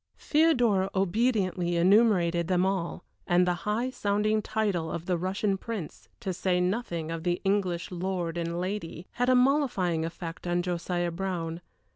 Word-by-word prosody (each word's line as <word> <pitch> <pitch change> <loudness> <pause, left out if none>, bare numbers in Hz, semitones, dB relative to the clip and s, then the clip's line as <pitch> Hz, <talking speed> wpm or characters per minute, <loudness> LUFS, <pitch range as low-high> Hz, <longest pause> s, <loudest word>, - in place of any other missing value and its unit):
Theodora 245 -12 +3
obediently 190 -3 +1
enumerated 175 -2 +4
them 180 0 +2
all, 190 -3 -2 0.2
and 175 +1 +4
the 180 - +2 0.2
high 235 +5 0
sounding 210 -1 +1
title 200 -7 -1
of 170 - -4
the 180 - +1
Russian 190 +3 -1
Prince, 215 -9 -6
to 195 -5 -2
say 180 0 0
nothing 180 -4 -1
of 165 -1 -4
the 175 +1 0
English 190 -3 0
lord 180 -2 -2
and 170 0 -2
lady, 180 -2 -4
had 245 +1 0
a 255 - +5
mollifying 250 - +2
effect 165 +1 -6
on 175 0 +1
Josiah 175 0 -1
Brown. 170 -2 -3
185 Hz, 150 wpm, -28 LUFS, 175-210 Hz, 0.2 s, a